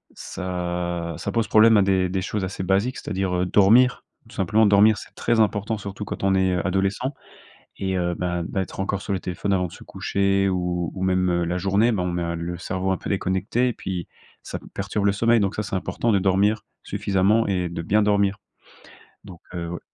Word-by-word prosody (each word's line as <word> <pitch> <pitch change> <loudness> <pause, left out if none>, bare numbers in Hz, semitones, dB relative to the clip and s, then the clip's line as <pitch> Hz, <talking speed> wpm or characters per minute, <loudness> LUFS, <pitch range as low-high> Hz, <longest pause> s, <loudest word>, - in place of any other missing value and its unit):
ça 85 -2 -4
ça - - -4
pose 115 -2 0
problème 110 +1 +6
à - - +5
des 95 -1 +2
des 95 0 -1
choses 105 0 -3
assez 95 0 -4
basiques. 100 +7 +1
C'est-à-dire, 95 -2 -2
heu, 90 +1 +1
dormir. 115 +7 +4 0.2
Tout - - -15
simplement 105 +4 +3
dormir, 105 +1 +5
c'est - - -11
très 115 -1 +1
important 105 +1 +1
surtout 100 +1 -6
quand 95 - -6
on 95 0 +3
est, 95 -1 +2
heu, 90 - -1
adolescent. 95 +8 0 0.6
Et 95 -1 -2
heu, 85 -1 -1
bah, 90 -1 -2
d'être 95 +2 -3
encore 100 0 -2
sur 100 - -3
le 95 - -2
téléphone 95 +2 -2
avant 90 -1 +1
de - - -14
se - - -13
coucher 100 0 0
ou 90 -2 -1
ou 95 - -7
même, 90 -1 +2
heu, 85 0 +1
la 90 +2 -1
journée, 100 +6 +2
bah, 95 - -1
on 90 - -1
met 85 0 -2
à 85 0 -2
le 85 +1 -4
cerveau 95 +2 -2
un 95 - 0
peu - - -7
déconnecté 100 +6 0
et 120 - -3
puis 90 -2 -5 0.4
ça - - -6
p - - -17
perturbe 100 +1 -2
le 100 - +3
sommeil. 115 +3 +3
Donc 100 -1 0
ça, 105 - -2
c'est 95 -1 -2
important 115 +4 -1
de 100 - +3
dormir 100 +3 +2 0.2
suffisamment 100 +4 +1
et 90 -3 0
de 85 0 -5
bien 105 +6 +2
dormir. 100 -1 +2 0.9
Donc 90 -4 -12
heu, 85 -1 -4
ouais 85 - -5
95 Hz, 220 wpm, -23 LUFS, 90-105 Hz, 0.9 s, problème